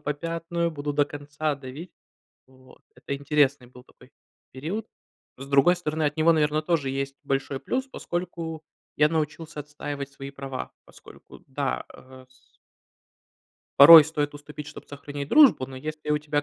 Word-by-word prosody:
попятную. 165 +3 -3
Буду 145 -2 -4
до 145 0 +3
конца 145 +1 -4
давить". 140 +6 -10 0.5
Вот. 130 -1 -20
Это 140 +2 -5
интересный 140 -3 +1
был 125 0 -16
такой - - -21 0.4
период. 175 - -5 0.5
С 135 - -8
другой 140 +6 +4
стороны, 160 -2 -3
от 150 +1 -1
него, 160 +1 +4
наверно, 155 -1 +1
тоже 155 -5 0
есть 135 0 -4
большой 135 0 -2
плюс, 260 +1 -2
поскольку 170 -7 -5 0.3
я 150 0 +4
научился 155 0 -3
отстаивать 145 -1 -6
свои 140 0 -9
права. 135 -1 -7
Поскольку, - - -16
да, 135 -1 -2
а 130 0 -15
с 130 0 -29 1.2
Порой 155 +2 +12
стоит 145 -1 -3
уступить, 150 0 -9
чтоб 150 - -10
сохранить 145 0 -7
дружбу, 275 - +6
но 130 - -9
если 155 +2 -6
у 150 - +2
тебя 150 -1 -1
145 Hz, 150 wpm, -25 LUFS, 140-155 Hz, 1.2 s, Порой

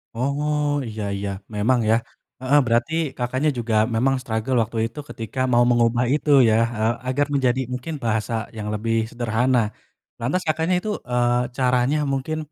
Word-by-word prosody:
Oh 145 +3 0
iya 110 -1 -5
iya 100 0 -3 0.3
memang 120 +4 +2
ya, 110 - +5 0.5
heeh, 140 +3 +4
berarti 120 +7 +1 0.2
Kakaknya 130 +5 0
juga 115 -1 -2 0.2
memang 135 +4 +2
struggle 110 +1 -2
waktu 115 +1 -7
itu 115 +6 -11
ketika 115 +3 -6
mau 120 0 +5
mengubah 120 0 +3
itu 150 0 -1 0.2
ya 110 - +3 0.5
agar 145 +3 +1
menjadi 130 -2 +2
mungkin 125 +6 -5
bahasa 110 0 -1 0.2
yang 105 0 -4
lebih 115 +2 -1 0.2
sederhana, 120 +1 +1 0.6
lantas 160 +10 0
Kakaknya 160 +3 +1
itu, 215 - -4 0.2
eee, 120 0 +1
caranya 125 +2 +2 0.2
mungkin, 145 +4 -2
125 Hz, 150 wpm, -22 LUFS, 115-140 Hz, 0.6 s, ya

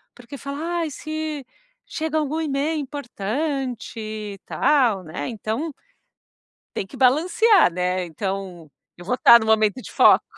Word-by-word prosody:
porque 250 +3 -10
fala: 280 +1 -6 0.2
"Ai, 320 - -2
se 310 -2 -5 0.4
chega 315 0 -2
algum 310 +1 -1
e-mail 300 +1 -1
importante 270 -1 -4
e 215 -2 -6
tal", 240 -10 +2
né? 155 -3 -5
Então 230 +8 -3 1.0
tem 195 - -3
que - - -12
balancear, 340 - +4
né. 180 +1 -1
Então, 185 -1 -5 0.3
eu 175 - -12
vou 245 - 0
estar 235 -1 +8
no - - -3
momento 220 +2 +3
de - - -10
foco. - - +6
250 Hz, 140 wpm, -23 LUFS, 200-300 Hz, 1.0 s, estar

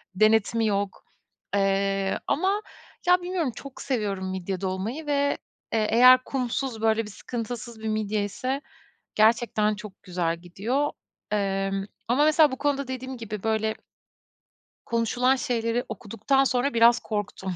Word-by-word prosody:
Denetimi 220 +2 +3
yok. 200 -1 -2 0.5
Eee, 195 0 +1
ama 390 +6 +1 0.5
ya, 360 0 +5
bilmiyorum, 350 -6 -1
çok 275 -2 -9
seviyorum 205 -8 -2
midye 190 0 -4
dolmayı 200 +11 -3
ve, 285 -1 +1 0.4
eee, 215 -1 +2
eğer 255 +2 +7
kumsuz, 255 -2 -2
böyle, 225 0 +2
bir 210 - -9
sıkıntısız 230 +1 -6
bir 220 - -4
midye 215 -1 0
ise 260 +7 -3 0.5
gerçekten 215 -1 +3
çok 210 -2 -11
güzel 175 -3 -1
gidiyor. 220 +12 -1 0.4
Emm, 195 -1 0 0.2
ama 270 +5 +4
mesela 310 -2 +5
bu 260 - -4
konuda 280 -2 0
dediğim 260 0 -5
gibi, 215 -4 -6
böyle 220 0 0 1.1
konuşulan 245 +3 +2
şeyleri 240 -3 -1
okuduktan 230 +5 0
sonra 255 +1 +1
biraz 230 +1 +6
korktum. 200 -3 -4
225 Hz, 130 wpm, -26 LUFS, 200-260 Hz, 1.1 s, eğer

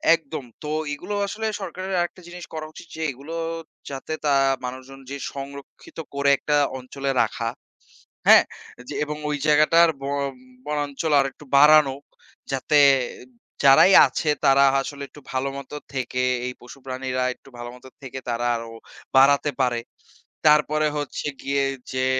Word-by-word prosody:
একদম, 155 -3 -7 0.2
তো 150 - -5 0.2
এগুলো 205 +8 -5
আসলে 220 +2 -5 0.2
সরকারের 185 +1 -5
আরেকটা 175 +1 -3
জিনিস 175 0 -9
করা 155 -1 -5
উচিত 170 - -12
যে, 160 - -6
এগুলো 140 +6 -9 0.5
যাতে 140 +3 -5
তা 145 - +3 0.3
মানুষজন 130 +2 -8
যে 140 - -4 0.2
সংরক্ষিত 140 0 -10 0.2
করে 140 0 +2
একটা 150 -1 0 0.2
অঞ্চলে 135 +2 -4
রাখা, 115 -1 -1 0.8
হ্যাঁ? - - +9 0.5
যে - - -5
এবং 150 0 -4
ওই 145 - -1
জায়গাটার 155 +3 +5
ব - - -8 0.6
বনাঞ্চল 150 +1 -2
আরেকটু 135 +1 -2
বাড়ানো। 150 -2 +6 0.6
যাতে 145 +3 +2 0.8
যারাই 140 +8 +7
আছে 155 - -2 0.2
তারা 140 0 +6 0.2
আসলে 140 +1 -7
একটু 150 - -15
ভালোমত 135 +1 -4 0.2
থেকে, 125 -1 -2 0.2
এই 125 - -4
পশুপ্রাণীরা 130 0 -4
একটু - - -19
ভালোমত 120 +2 -9 0.2
থেকে 130 0 -7
তারা 120 +1 -1
আরও 115 0 -7 0.4
বাড়াতে 140 +2 +5
পারে। 120 -2 +1 0.7
তারপরে 150 0 +4
হচ্ছে 145 0 -4 0.2
গিয়ে 140 0 0 0.3
যে 130 0 0
140 Hz, 135 wpm, -23 LUFS, 130-150 Hz, 0.8 s, হ্যাঁ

